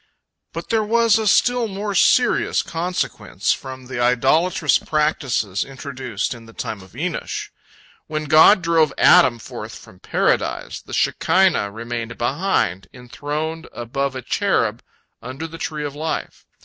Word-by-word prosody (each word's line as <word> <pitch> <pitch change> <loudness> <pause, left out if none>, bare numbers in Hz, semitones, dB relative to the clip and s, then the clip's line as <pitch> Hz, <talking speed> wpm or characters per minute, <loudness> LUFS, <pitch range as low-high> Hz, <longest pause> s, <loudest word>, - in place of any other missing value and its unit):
But - - -7
there 225 -1 +2
was 230 0 +3
a 220 - -1
still 245 +3 +3
more 205 0 -4
serious 245 +6 +3
consequence 175 +2 -2
from 130 -1 -9
the 130 -1 -6
idolatrous 145 +7 +2
practices 135 -10 0
introduced 135 -5 -5
in 115 -2 -13
the 115 - -14
time 105 -3 -4
of 95 +1 -17
Enosh. 165 +5 -4 0.6
When 155 0 -3
God 155 +6 +6
drove 165 -3 +3
Adam 120 -2 +6
forth 110 - -8
from - - -16
Paradise, - - -1
the - - -15
Shekinah 180 - +2
remained 115 +2 -6
behind, 120 - 0
enthroned 145 +6 -5
above 135 +3 -3
a 130 - -6
cherub - - 0 0.4
under 130 +7 -6
the 165 0 -9
tree 150 -1 -4
of 145 - -5
life. 155 +2 -5
145 Hz, 135 wpm, -21 LUFS, 120-170 Hz, 0.6 s, God